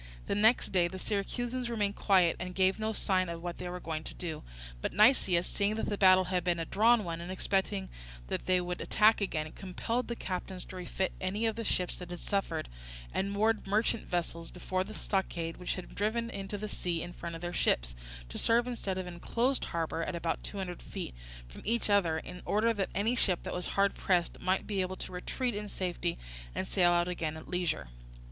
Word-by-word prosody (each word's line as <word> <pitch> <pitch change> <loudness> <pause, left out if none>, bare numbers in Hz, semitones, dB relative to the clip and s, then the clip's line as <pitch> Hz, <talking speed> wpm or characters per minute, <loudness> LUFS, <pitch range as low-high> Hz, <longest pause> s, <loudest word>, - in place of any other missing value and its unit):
The - - -1
next 220 +4 +4
day 180 -2 +3
the 190 +2 -6
Syracusans 240 +6 -2
remained 205 -3 0
quiet, 185 -4 +4
and 180 0 -5
gave 190 +2 +3
no 220 0 0
signs 185 -4 +1
of 170 0 -5
what 175 -1 -4
they 180 - -4
were 180 0 -4
going 160 -2 -3
to - - -7
do; 165 -3 -4 0.4
but - - -2
Nicias, 195 -6 +5
seeing 205 +1 0
that 220 - -1
the 205 - 0
battle 185 -1 +7
had 180 -1 0
been 175 -1 +2
a 165 - -2
drawn 225 +5 +4
one, 170 -2 -4
and 175 +2 -5
expecting 190 +1 0 0.4
that - - -3
they 185 -1 +4
would 180 0 -3
attack 215 0 +4
again, 155 -5 -1
compelled 225 +6 -2
the 235 - -2
captains 185 -2 -4
to - - -10
refit 185 +1 -2
any 200 +5 0
of 225 -1 +1
the 230 - -3
ships 180 -4 -1
that 180 -1 -7
had 175 -1 -5
suffered, 200 - -1 0.5
and 195 +1 0
moored 215 +1 +2
merchant 215 +3 +1
vessels 170 -1 -2
before 185 +1 -1
the 215 +3 -9
stockade 170 -4 -1
which 180 - -2
they 185 - -5
had - - -14
driven 230 +3 0
into 195 +1 -4
the 215 +1 -4
sea 175 -5 -2
in 175 - -7
front 170 -1 -6
of 165 - -7
their 175 0 -3
ships, - - +1 0.3
to - - -3
serve 235 +1 +4
instead 225 -6 -3
of 185 - -2
an 180 - -6
enclosed 245 +9 0
harbour, 165 -1 -2
at 170 - -3
about 170 -1 -1
two 205 - -5
hundred 180 -3 -4
feet - - -6 0.3
from - - -11
each 230 -1 +1
other, 175 -6 +4
in 180 +3 -7
order 225 +3 +3
that 200 -3 -1
any 220 +5 +2
ship 185 -7 +3
that - - -4
was 180 - -2
hard 200 0 +4
pressed 175 -3 +1
might 185 +1 +1
be 200 -2 0
able 185 0 -2
to - - -5
retreat 240 +7 -2
in 210 0 -3
safety 180 - -2 0.4
and - - -1
sail 180 -2 +3
out 175 0 +3
again 160 -3 -2
at 160 - -10
leisure. 175 - -1
185 Hz, 220 wpm, -32 LUFS, 175-210 Hz, 0.5 s, battle